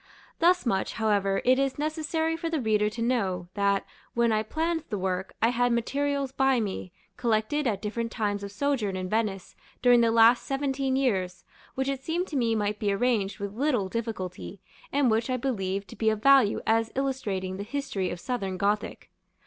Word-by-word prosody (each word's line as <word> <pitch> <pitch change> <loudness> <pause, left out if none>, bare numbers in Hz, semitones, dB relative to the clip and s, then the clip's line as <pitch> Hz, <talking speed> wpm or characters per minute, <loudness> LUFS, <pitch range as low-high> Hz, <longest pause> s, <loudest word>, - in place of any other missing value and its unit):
Thus 360 0 +4
much, 195 -5 0
however, 200 -3 +1
it 255 +1 +4
is 275 -1 0
necessary 315 +2 -1
for 330 0 -3
the 325 -2 -1
reader 210 -3 +2
to 230 +2 -4
know, 190 -8 -1
that, 200 -1 +1 0.3
when 235 -1 +3
I 215 0 +2
planned 325 +7 -1
the 210 - -2
work, 185 0 -3
I 230 - +5
had 245 0 +1
materials 275 +3 0
by 270 -1 +2
me, 195 -4 -4 0.3
collected 240 +4 0
at 205 -3 -1
different 230 +2 -3
times 205 -4 -1
of 200 - -6
sojourn 225 -4 -1
in 185 0 -4
Venice 210 -4 -2 0.3
during 245 -1 +6
the 230 - +4
last 230 +1 +6
seventeen 270 -1 -1
years, 190 -9 0 0.3
which 265 0 -1
it 275 -1 -2
seemed 340 +4 -1
to 300 - -5
me 230 -4 +2
might 210 -1 -1
be 205 -2 +1
arranged 205 -2 0
with 200 0 -4
little 245 -5 0
difficulty, 200 -4 -5 0.3
and 275 -4 +3
which 225 +3 +1
I 255 - +1
believe 200 -6 -2
to 180 - -12
be 220 - +2
of 215 0 -2
value 275 -6 +5
as 225 0 +2
illustrating 210 -9 -2
the 200 - -4
history 250 -5 -3
of 175 - -5
Southern 195 -5 -3
Gothic. 205 +2 -1
230 Hz, 190 wpm, -27 LUFS, 200-270 Hz, 0.3 s, during